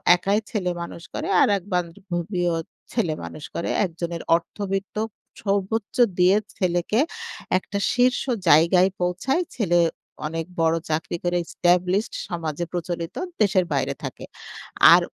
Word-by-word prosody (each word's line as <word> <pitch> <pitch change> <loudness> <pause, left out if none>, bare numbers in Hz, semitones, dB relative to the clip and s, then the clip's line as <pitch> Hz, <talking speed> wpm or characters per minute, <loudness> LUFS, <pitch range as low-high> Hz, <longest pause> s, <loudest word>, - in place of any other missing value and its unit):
একাই 200 +4 +1
ছেলেমানুষ 175 -4 -3
করে। - - -3
আরেক 200 -3 +3
বান্ধবীও 175 0 -1 0.4
ছেলে 205 -10 0
মানুষ 155 - -8
করে। 170 - -2 0.2
একজনের 170 -1 -4
অর্থবিত্ত 195 +3 -3 0.5
সর্বোচ্চ 200 +1 -1 0.2
দিয়ে 185 +3 +5 0.2
ছেলেকে 175 +4 +1 0.6
একটা 190 +2 -4 0.2
শীর্ষ 250 +1 +3 0.3
জায়গায় 170 +5 +6
পৌঁছায়, 185 - +1
ছেলে 175 -7 +3 0.5
অনেক 165 +1 -3 0.2
বড় 165 0 +3
চাকরি 160 +2 -1
করে 175 0 +1
এস্টাবলিশড, 180 +5 +1
সমাজে 170 -1 -3
প্রচলিত, 170 -1 -4 0.3
দেশের 190 -3 +4
বাইরে - - 0
থাকে। - - -6 0.7
আর - - +7
180 Hz, 115 wpm, -24 LUFS, 170-195 Hz, 0.7 s, আর